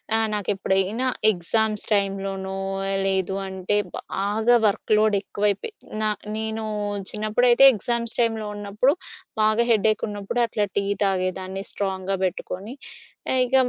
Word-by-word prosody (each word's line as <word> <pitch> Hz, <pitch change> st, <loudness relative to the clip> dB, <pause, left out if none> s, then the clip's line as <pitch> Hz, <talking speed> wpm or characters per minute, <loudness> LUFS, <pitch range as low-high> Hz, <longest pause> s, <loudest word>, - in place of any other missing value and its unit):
ఆహ్, 225 Hz, 0 st, +2 dB
నాకెప్పుడైనా 200 Hz, +2 st, 0 dB, 0.2 s
ఎగ్జామ్స్ 215 Hz, +3 st, 0 dB
టైంలోనో, 195 Hz, -1 st, -1 dB, 0.5 s
లేదు 190 Hz, 0 st, 0 dB
అంటే, 190 Hz, +1 st, -2 dB, 0.4 s
బాగా 215 Hz, +5 st, +2 dB
వర్క్‌లోడ్ 215 Hz, +1 st, +2 dB
ఎక్కువైపోయి 205 Hz, -, -1 dB, 0.3 s
నా 215 Hz, -, +2 dB, 0.3 s
నేను 220 Hz, 0 st, -3 dB, 0.5 s
చిన్నప్పుడైతే 240 Hz, +4 st, +3 dB
ఎగ్జామ్స్ 235 Hz, +2 st, -2 dB
టైంలో 225 Hz, -2 st, +1 dB
ఉన్నప్పుడు 205 Hz, +6 st, +1 dB, 0.5 s
బాగా 215 Hz, +2 st, +3 dB
హెడ్‌యెక్ 215 Hz, -1 st, +2 dB
ఉన్నప్పుడు 205 Hz, +3 st, -2 dB
అట్లా 215 Hz, -2 st, -1 dB
టీ 200 Hz, -, +2 dB, 0.2 s
తాగేదాన్ని 190 Hz, 0 st, -1 dB
స్ట్రాంగ్‌గా 190 Hz, -1 st, -2 dB
పెట్టుకొని. 190 Hz, +5 st, -5 dB, 0.6 s
ఆహ్, 260 Hz, -, +3 dB
ఇక 255 Hz, +2 st, 0 dB
205 Hz, 110 wpm, -24 LUFS, 195-220 Hz, 0.6 s, చిన్నప్పుడైతే